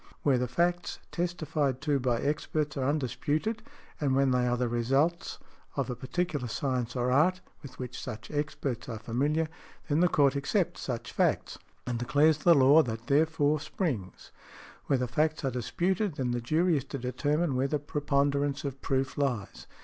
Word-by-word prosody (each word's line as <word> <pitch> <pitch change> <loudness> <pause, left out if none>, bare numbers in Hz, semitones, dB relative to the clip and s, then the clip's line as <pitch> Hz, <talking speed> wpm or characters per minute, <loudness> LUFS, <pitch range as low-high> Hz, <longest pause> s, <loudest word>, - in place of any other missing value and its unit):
Where 135 -4 +3
the 125 - 0
facts 175 - 0
testified 155 -6 -1
to 145 -2 +1
by 120 -2 0
experts 150 0 -1
are 135 -1 0
undisputed, 150 - -1 0.4
and 140 -3 +1
when 135 -1 +3
they 125 -1 +2
are 125 0 +1
the 125 0 0
results 135 +9 0 0.4
of - - -1
a - - -3
particular 145 +2 -2
science 125 0 -2
or 125 0 0
art, 170 +8 +3 0.2
with 130 -3 -11
which 125 -1 -6
such 120 -3 -7
experts 145 -5 -3
are 115 - -4
familiar, 145 +9 0 0.4
then 145 +1 +2
the 180 - +5
Court 140 -4 +3
accepts 175 +6 0
such 120 -3 -4
facts, - - 0 0.3
and 120 -1 -2
declares 145 +5 +3
the 170 0 +6
law 140 +3 +7
that 115 -4 -4
therefrom 150 +1 +2
springs; 135 - -4 0.6
where 140 - +3
the 125 0 -1
facts 150 +4 0
are 135 - +1
disputed 175 - -1
then 130 -3 -1
the 120 0 -1
jury 160 +8 +2
is 135 - -2
to 140 - -5
determine 145 +4 0
where 130 +2 +1
the 150 - 0
preponderance 140 -1 0
of 135 -2 -5
proof 135 0 -1
lies. 125 -8 -2
140 Hz, 170 wpm, -29 LUFS, 125-155 Hz, 0.6 s, law